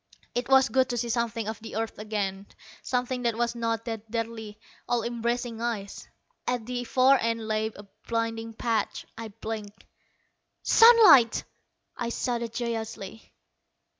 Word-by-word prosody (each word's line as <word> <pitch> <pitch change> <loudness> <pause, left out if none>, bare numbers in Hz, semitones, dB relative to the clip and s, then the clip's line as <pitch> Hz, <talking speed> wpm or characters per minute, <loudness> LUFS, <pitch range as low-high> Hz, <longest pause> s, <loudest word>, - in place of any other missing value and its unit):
It 245 +1 -2
was 265 0 +6
good 260 -1 +2
to 245 - -2
see 235 0 -2
something 230 -1 -1
of 220 -1 -4
the 225 - -9
earth 225 -1 -3
again, 200 -2 -3 0.3
something 250 0 -1
that 235 -2 0
was 240 0 0
not 230 -1 -2
that 225 -2 -5
deadly, 225 -2 -4 0.3
all 240 -2 +1
embracing 235 0 -2
ice. 220 -4 -4 0.4
At 245 -3 -1
the 245 0 -3
far 260 +3 +4
end 230 -1 -1
lay 215 0 0
a 210 -2 -10 0.2
blinding 230 0 -2
patch. 225 -2 -1
I 225 0 -6
blinked. 215 -1 -7 0.8
"Sunlight!" 425 - +7 0.5
I 235 - -3
shouted 235 -1 -2
joyously. 225 -3 -5
230 Hz, 140 wpm, -27 LUFS, 220-240 Hz, 0.8 s, Sunlight